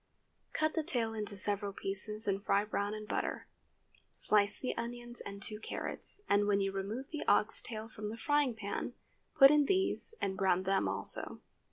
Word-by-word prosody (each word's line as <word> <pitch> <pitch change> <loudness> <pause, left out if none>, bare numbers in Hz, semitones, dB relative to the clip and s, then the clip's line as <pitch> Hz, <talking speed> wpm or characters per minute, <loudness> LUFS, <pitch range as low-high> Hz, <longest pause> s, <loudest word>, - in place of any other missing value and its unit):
Cut 310 0 +1
the 320 - +1
tail 240 -8 -1
into 210 -2 -3
several 200 +1 -1
pieces 210 +3 -2
and 200 0 0
fry 200 0 +2
brown 205 0 -1
in 215 0 -6
butter. - - -2 0.7
Slice 205 -1 +3
the 255 - -3
onions 240 +1 -5
and 200 0 -7
two 210 +1 -3
carrots, 400 - -5
and 205 0 +3
when 200 -1 +3
you 195 0 0
remove 205 +8 -4
the 305 - -3
ox 210 +1 +3
tail 220 -1 -6
from 215 -2 -6
the 220 +2 -5
frying 290 0 +2
pan, 205 -2 -4 0.4
put 275 -2 +9
in 300 -1 +5
these 385 +5 0
and 190 -1 -1
brown 190 -1 +2
them 195 +1 +2
also. - - +1
215 Hz, 180 wpm, -34 LUFS, 200-240 Hz, 0.7 s, put